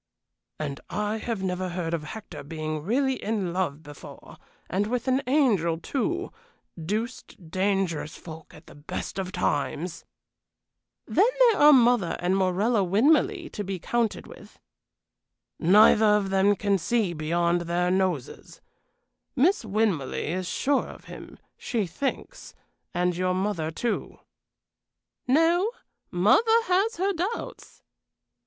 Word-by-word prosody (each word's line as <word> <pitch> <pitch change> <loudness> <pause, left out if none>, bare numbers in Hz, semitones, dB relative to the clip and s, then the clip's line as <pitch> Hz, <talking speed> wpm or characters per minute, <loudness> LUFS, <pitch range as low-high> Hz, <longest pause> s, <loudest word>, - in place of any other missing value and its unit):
"And 145 -3 -4
I 210 +3 -2
have 220 -3 -4
never 185 0 -2
heard 175 -2 -3
of 155 -2 -3
Hector 215 +7 -8
being 155 +1 -4
really 260 - 0
in 200 -5 -2
love 160 -5 -2
before, 145 -1 -12 0.3
and 200 +3 -1
with 245 +2 -2
an 260 +1 +2
angel, 215 - +2
too 335 - -2 0.5
deuced 210 -3 -5
dangerous 185 -5 -1
folk 160 -2 -11
at 155 - -16
the - - -14
best 145 +6 -6
of 185 -1 -4
times!" 170 -1 -2 1.0
"Then 460 - +3
there 480 -4 +5
are 300 +1 +7
mother 240 - +4
and 180 +2 +1
Morella 195 +4 +1
Winmarleigh 310 - +2
to 205 - -4
be 195 -1 -4
counted 230 +5 -1
with." - - -14 1.0
"Neither 210 +5 +6
of 210 -2 +2
them 195 +1 +3
can 200 0 0
see 210 0 0
beyond 170 +2 0
their 175 +1 0
noses. 185 -8 -2 0.8
Miss 320 +7 +3
Winmarleigh 195 -9 -1
is 185 -1 -3
sure 280 +9 0
of - - -12
him, - - -11 0.2
she 225 -5 -1
thinks 275 - -5 0.4
and 180 0 0
your 185 +1 0
mother, 185 -5 -1
too." 230 +8 -3 1.1
"No; 330 - +3 0.4
mother 180 - +4 0.2
has 395 +4 +1
her 390 +3 0
doubts." 380 +7 -5
195 Hz, 130 wpm, -26 LUFS, 175-245 Hz, 1.1 s, are